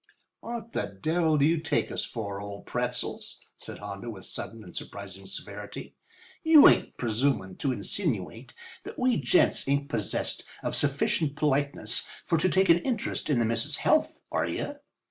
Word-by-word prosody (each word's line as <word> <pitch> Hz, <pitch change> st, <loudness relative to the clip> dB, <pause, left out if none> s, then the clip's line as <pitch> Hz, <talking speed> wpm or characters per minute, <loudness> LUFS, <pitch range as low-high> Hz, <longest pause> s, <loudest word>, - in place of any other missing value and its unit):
"What 230 Hz, -1 st, -6 dB
the 100 Hz, -, -3 dB
devil 160 Hz, -, +2 dB
do 140 Hz, -, +4 dB
you 165 Hz, +1 st, +3 dB
take 160 Hz, -, 0 dB
us -, -, -2 dB
for, 100 Hz, -4 st, -4 dB
old 100 Hz, 0 st, -8 dB
Pretzels?" -, -, -3 dB, 0.2 s
said -, -, -8 dB
Hondo 105 Hz, +3 st, -6 dB
with 100 Hz, -4 st, -8 dB
sudden 115 Hz, -1 st, -6 dB
and 90 Hz, -, -13 dB
surprising 95 Hz, -1 st, -7 dB
severity. -, -, -7 dB, 0.5 s
"You 320 Hz, -3 st, +9 dB
ain't -, -, +3 dB
presumin' 110 Hz, -5 st, 0 dB
to 140 Hz, -, 0 dB
insinuate 120 Hz, -, -3 dB, 0.3 s
that 415 Hz, +4 st, -9 dB
we 250 Hz, -1 st, +3 dB
gents 130 Hz, -1 st, +3 dB
ain't 140 Hz, +1 st, +1 dB
possessed 110 Hz, -5 st, -2 dB, 0.2 s
of -, -, -1 dB
sufficient 145 Hz, +1 st, +1 dB
politeness 140 Hz, -6 st, 0 dB, 0.2 s
for 165 Hz, -, +2 dB
to 185 Hz, -, +3 dB
take 190 Hz, +1 st, +3 dB
an 170 Hz, +1 st, +7 dB
interest 230 Hz, -4 st, -2 dB
in 145 Hz, -, +3 dB
the 120 Hz, -, +3 dB
miss's 115 Hz, +7 st, 0 dB
health, 310 Hz, -, +2 dB
are -, -, +1 dB
you? 290 Hz, -, -3 dB
140 Hz, 165 wpm, -28 LUFS, 105-165 Hz, 0.5 s, You